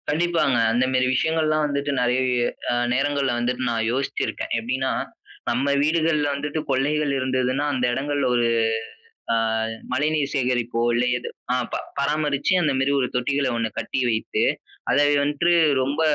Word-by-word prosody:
கண்டிப்பாங்க. 165 Hz, -4 st, +1 dB, 0.2 s
அந்த 125 Hz, +2 st, +2 dB
மேரி 130 Hz, 0 st, +2 dB
விஷயங்கள்லாம் 155 Hz, +1 st, +1 dB
வந்துட்டு, 140 Hz, 0 st, -2 dB
நெறைய 125 Hz, +1 st, +1 dB, 0.4 s
அ -, -, +1 dB, 0.2 s
நேரங்கள்ல 140 Hz, -1 st, +1 dB
வந்துட்டு 125 Hz, +1 st, -1 dB
நான் 115 Hz, -1 st, 0 dB
யோசிச்சிருக்கேன். 135 Hz, +2 st, -2 dB
எப்டின்னா, 130 Hz, +3 st, -1 dB, 0.6 s
நம்ம 130 Hz, +4 st, 0 dB, 0.2 s
வீடுகள்ல 155 Hz, -1 st, +2 dB
வந்துட்டு 150 Hz, +2 st, -3 dB
கொள்ளைகள் 145 Hz, +2 st, +1 dB
இருந்ததுன்னா, 130 Hz, +2 st, 0 dB
அந்த 125 Hz, -2 st, 0 dB
இடங்கள்ல 145 Hz, +2 st, -1 dB
ஒரு 120 Hz, -1 st, +2 dB, 0.9 s
ஆ -, -, +3 dB, 0.6 s
மழைநீர் 150 Hz, +1 st, 0 dB
சேகரிப்போ, 125 Hz, -3 st, 0 dB
இல்ல 120 Hz, +1 st, +2 dB
ஏதோ 120 Hz, -, -6 dB, 0.3 s
ஆ -, -, +2 dB, 0.2 s
ப -, -, +1 dB, 0.2 s
பராமரிச்சு 145 Hz, +3 st, +1 dB
அந்தமேரி 140 Hz, -2 st, +1 dB
ஒரு 125 Hz, -, 0 dB
தொட்டிகள 140 Hz, +2 st, 0 dB
ஒண்ணு 115 Hz, -1 st, 0 dB
கட்டி 130 Hz, -, -3 dB
வைத்து 110 Hz, -, -1 dB, 0.5 s
அத -, -, +3 dB, 0.3 s
வந்துட்டு, 150 Hz, +4 st, +1 dB, 0.3 s
ரொம்ப 140 Hz, +4 st, -1 dB
135 Hz, 140 wpm, -23 LUFS, 125-150 Hz, 0.9 s, ஆ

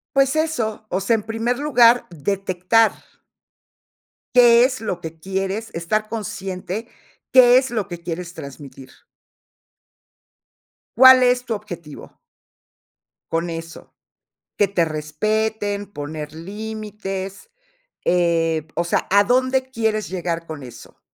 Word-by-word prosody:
Pues 275 Hz, 0 st, +3 dB
eso, 240 Hz, -10 st, -1 dB
o 185 Hz, -, -1 dB
sea, 195 Hz, +4 st, +2 dB
en 220 Hz, -, -1 dB
primer 225 Hz, +3 st, -2 dB
lugar, 245 Hz, -5 st, +4 dB
detectar 185 Hz, +5 st, +1 dB, 1.4 s
qué 240 Hz, -1 st, +7 dB
es 260 Hz, 0 st, -1 dB
lo 185 Hz, -5 st, -3 dB
que 165 Hz, -1 st, -8 dB
quieres 195 Hz, +5 st, -3 dB
estar 215 Hz, +6 st, -1 dB
consciente, 195 Hz, 0 st, -5 dB, 0.4 s
qué 250 Hz, -1 st, +8 dB
es 260 Hz, 0 st, -1 dB
lo 220 Hz, -5 st, -2 dB
que 175 Hz, -, -6 dB
quieres 170 Hz, +1 st, -5 dB
transmitir. 140 Hz, -4 st, -10 dB, 2.1 s
¿Cuál 260 Hz, 0 st, +9 dB
es 250 Hz, 0 st, +3 dB
tu 230 Hz, -2 st, -2 dB
objetivo? 175 Hz, -8 st, -10 dB, 1.1 s
Con 165 Hz, +1 st, -1 dB
eso, 165 Hz, 0 st, -8 dB, 0.6 s
que 205 Hz, -, +3 dB
te 185 Hz, -3 st, +1 dB
respeten, 205 Hz, +7 st, -2 dB
poner 150 Hz, +1 st, -6 dB
límites, 205 Hz, -, -6 dB, 0.5 s
eh, 165 Hz, -3 st, +1 dB
o 170 Hz, -, 0 dB
sea, 170 Hz, -, 0 dB
¿a 200 Hz, +1 st, +5 dB
dónde 255 Hz, +3 st, +1 dB
quieres 220 Hz, -3 st, -1 dB
llegar 170 Hz, -2 st, -3 dB
con 155 Hz, -3 st, -7 dB
eso? 120 Hz, -2 st, -13 dB
200 Hz, 115 wpm, -21 LUFS, 170-230 Hz, 2.1 s, Cuál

